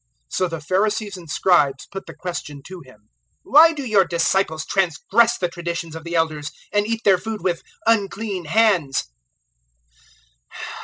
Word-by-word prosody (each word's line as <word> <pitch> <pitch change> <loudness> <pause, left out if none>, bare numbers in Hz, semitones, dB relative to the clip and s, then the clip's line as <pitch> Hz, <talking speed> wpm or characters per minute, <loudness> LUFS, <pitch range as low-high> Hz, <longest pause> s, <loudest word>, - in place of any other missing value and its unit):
007:005 - - -3
So 185 - +2
the 165 -2 -6
Pharisees 205 +4 0
and 170 -3 -12
Scribes 145 -5 +2
put 195 0 -7
the - - -10
question 150 -6 -6
to 185 -2 -9
Him: 110 -5 -20 0.3
"Why 320 +3 +7
do 290 -4 -6
your 210 -5 +4
disciples 170 -2 0
transgress 195 +6 +2
the 180 - 0
traditions 170 -2 -5
of 160 - -8
the 170 0 -4
Elders, 155 -2 0 0.2
and 205 0 +2
eat 230 0 -2
their 190 -3 +5
food 220 +1 -5
with 175 -3 -1 0.2
unclean 205 -4 0
hands?" 180 -6 +2
185 Hz, 155 wpm, -21 LUFS, 160-210 Hz, 0.3 s, Why